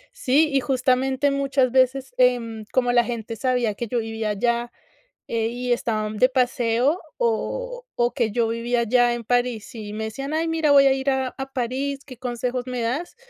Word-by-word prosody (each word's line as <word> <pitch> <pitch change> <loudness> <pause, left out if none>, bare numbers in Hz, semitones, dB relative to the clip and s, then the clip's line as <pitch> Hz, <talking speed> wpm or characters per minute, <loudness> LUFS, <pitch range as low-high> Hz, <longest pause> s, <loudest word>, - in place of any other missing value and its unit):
Sí, 300 - +3
y 275 - +4
justamente 260 +1 +1
muchas 275 -2 +1
veces, 260 0 +2
em, 235 -3 +1
como 245 -2 +2
la 240 0 +4
gente 230 -1 -5
sabía, 245 -2 0
que 235 +4 -5
yo 245 - -2
vivía 225 -1 -2
allá, 235 +3 0 0.6
eh, 225 -1 0
y 245 +1 -3
estaban 215 -3 -2
de 255 +3 +4
paseo, 250 +3 +1 0.2
o - - -2
o 240 0 +1
que 235 -4 0
yo 230 +1 +1
vivía 235 +1 0
allá 240 +1 +3
en 240 - -6
París 245 -1 -1
y 210 -2 -7
me 220 +1 -3
decían, 275 +7 -5
ay, 325 +1 0
mira, 325 -2 +1
voy 280 -1 +7
a 270 - +5
ir 265 +1 -1
a 265 -1 0
a 270 0 -6
París, 270 +2 -2
¿qué 255 -3 -11
consejos, 245 0 -3
me 250 -1 -3
das? 255 +10 -2
250 Hz, 190 wpm, -23 LUFS, 235-270 Hz, 0.6 s, voy